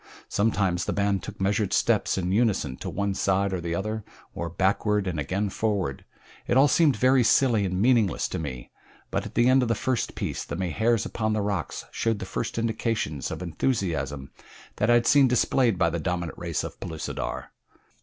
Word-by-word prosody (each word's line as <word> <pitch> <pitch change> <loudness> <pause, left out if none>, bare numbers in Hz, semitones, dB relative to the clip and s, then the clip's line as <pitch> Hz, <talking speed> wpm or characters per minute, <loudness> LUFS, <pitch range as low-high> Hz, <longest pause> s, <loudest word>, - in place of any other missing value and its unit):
Sometimes 95 -4 +1
the - - -1
band 100 -2 +1
took - - -9
measured 100 +1 0
steps - - +2
in 90 -1 -1
unison 100 - +1
to - - -5
one 100 0 -1
side 95 0 +1
or 90 - -2
the 85 0 -2
other, 110 +3 -3 0.3
or 85 - -4
backward 95 +3 +1
and 90 -5 -2
again 95 +8 -1
forward 100 -9 -2 0.4
it 120 - +2
all 140 +2 +7
seemed 150 0 +4
very 130 0 +4
silly 115 -2 +3
and 90 0 -2
meaningless 115 -4 +3
to - - -3
me, 65 -6 -6 0.4
but - - -1
at - - -14
the 120 - +4
end 130 +1 +5
of 125 - 0
the 115 - +1
first 130 +2 -1
piece - - -3
the - - -6
Mahars 105 +6 0
upon 110 -1 -1
the 110 - 0
rocks 100 -4 -3
showed 115 -1 0
the - - -6
first 115 - -4
indications 110 - -1
of - - -5
enthusiasm 80 - -2 0.5
that 105 - +1
I 120 - +6
had 120 0 +3
seen 140 -1 +6
displayed 125 -3 +2
by 85 -1 +2
the 85 - -2
dominant 85 -1 -3
race 85 -3 -2
of - - -7
Pellucidar. 80 -1 -5
100 Hz, 195 wpm, -26 LUFS, 85-115 Hz, 0.5 s, all